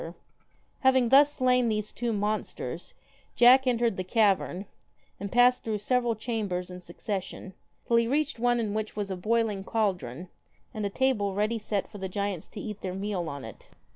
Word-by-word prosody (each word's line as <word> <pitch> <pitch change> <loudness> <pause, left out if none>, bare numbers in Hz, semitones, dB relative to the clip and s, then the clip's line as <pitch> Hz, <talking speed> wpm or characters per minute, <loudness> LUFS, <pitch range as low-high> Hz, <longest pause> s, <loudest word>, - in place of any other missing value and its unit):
KILLER 165 +2 -8 0.6
Having 260 -2 +4
thus 280 +3 +7
slain 250 -3 +2
these 215 -1 -2
two 240 -1 -2
monsters, 210 0 -3 0.4
Jack 255 +2 +7
entered 235 -4 +1
the 185 - -2
cavern, 195 -2 +1 0.5
and 200 -1 -5
passed 245 +1 +4
through 220 -2 -1
several 240 +2 +1
chambers 205 -6 -3
in 180 - -8
succession, 190 +1 -5 0.3
till 235 - +3
he 230 0 +3
reached 290 0 0
one 240 0 +2
in 215 -3 -2
which 215 0 -3
was 205 -2 -3
a - - -2
boiling 215 +1 0
caldron, 185 - -2 0.5
and 215 - -4
a - - -4
table 205 -4 0
ready 215 +3 0
set 205 -2 -2
for 205 - -11
the 190 0 -4
giants 200 -3 -3
to - - -10
eat 210 -1 -6
their 185 -1 -4
meal 195 -4 -3
on 140 -3 -7
it. 110 - -12
215 Hz, 180 wpm, -28 LUFS, 195-240 Hz, 0.6 s, thus